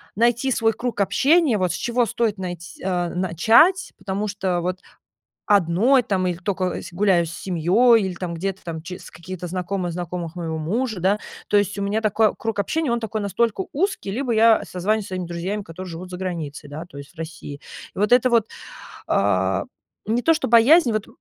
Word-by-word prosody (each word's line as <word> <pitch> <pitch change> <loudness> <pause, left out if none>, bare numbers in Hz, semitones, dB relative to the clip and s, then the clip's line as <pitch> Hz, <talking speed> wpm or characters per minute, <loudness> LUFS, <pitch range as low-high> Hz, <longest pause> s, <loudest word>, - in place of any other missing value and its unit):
найти 235 +4 +2
свой 225 -2 +2
круг 235 -1 -4
общения, 285 - +3
вот, 180 -3 0
с - - -3
чего 240 +2 0
стоит 220 -3 -1
найт 175 -2 -4 0.2
а, 180 -2 -1
начать, 220 - +3
потому 200 +2 -3
что 190 -3 -1
вот 180 +1 -3 0.7
одной, 205 +7 +4
там, 190 -5 0
иль 175 -1 -3
только 185 -1 -2
с 185 - -10
гуляю 180 -2 +2
с 165 - -7
семьёй 195 +8 +3
или 190 -2 -3
там 175 -2 -5
где-то 190 +3 -4
там 160 -2 -5
ч 180 +2 -7
с - - -12
какие-то 180 +1 -8
знакомые 180 0 -3
знакомых 175 -1 -5
моего 160 -2 -3
мужа, 215 +5 -2
да. 195 +4 +2 0.3
То 205 - +2
есть 205 0 0
у - - -2
меня 205 +2 0
такой 215 0 +2
круг 225 -2 -4
общения, 300 - -1
он 235 - 0
такой 220 -1 -3
настолько 230 - 0
узкий, 320 - -1
либо 250 +1 -1
я 225 0 +5
созваниваюсь 205 +4 -1
со - - -10
своими 185 -2 -3
друзьями, 180 +5 -3
которые 185 +1 -9
живут 175 +3 -7
заграницей, 170 -6 -5
да, 155 +3 -6
то 145 - -15
есть 140 - -11
в - - -26
России. 160 -3 -7 0.4
И - - -7
вот 210 +3 +1
это 250 0 +5
вот, 230 -2 +3 0.6
а, 95 -1 +1 0.4
не 230 +3 +1
то, 325 - +4
что 310 - -2
боязнь, 240 +3 +6
вот 215 -1 -2
195 Hz, 195 wpm, -22 LUFS, 175-225 Hz, 0.7 s, боязнь